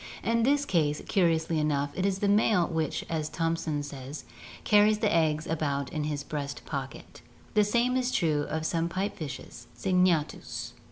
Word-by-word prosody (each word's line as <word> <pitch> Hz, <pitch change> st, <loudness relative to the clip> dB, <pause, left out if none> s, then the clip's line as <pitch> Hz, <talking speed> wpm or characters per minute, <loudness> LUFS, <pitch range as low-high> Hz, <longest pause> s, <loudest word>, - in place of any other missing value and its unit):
In 230 Hz, 0 st, +2 dB
this 285 Hz, +4 st, +3 dB
case, 150 Hz, -, +1 dB
curi 170 Hz, -4 st, +2 dB
ously 160 Hz, 0 st, -1 dB
enough, 145 Hz, -2 st, 0 dB
it 185 Hz, +4 st, 0 dB
is 190 Hz, -1 st, 0 dB
the 205 Hz, -, 0 dB
male 205 Hz, -3 st, +4 dB
which, 160 Hz, -3 st, -2 dB
as 155 Hz, -2 st, -2 dB
Thomson 165 Hz, -3 st, -1 dB
says, 140 Hz, 0 st, -7 dB, 0.4 s
"carries 210 Hz, 0 st, +5 dB
the 210 Hz, -1 st, +1 dB
eggs 155 Hz, -1 st, +2 dB
about 150 Hz, -1 st, -2 dB
in 155 Hz, -2 st, -1 dB
his 145 Hz, -1 st, -2 dB
breast 145 Hz, -2 st, -5 dB
pocket." 135 Hz, -3 st, -6 dB, 0.3 s
The 210 Hz, -, +5 dB
same 240 Hz, +4 st, +2 dB
is 255 Hz, -1 st, +1 dB
true 155 Hz, -8 st, +1 dB
of 160 Hz, 0 st, -2 dB
some 165 Hz, +1 st, 0 dB
pipe 190 Hz, +3 st, -2 dB
fishes 130 Hz, -5 st, -8 dB
(Syngnatkus). 180 Hz, -5 st, 0 dB
165 Hz, 170 wpm, -28 LUFS, 150-200 Hz, 0.4 s, carries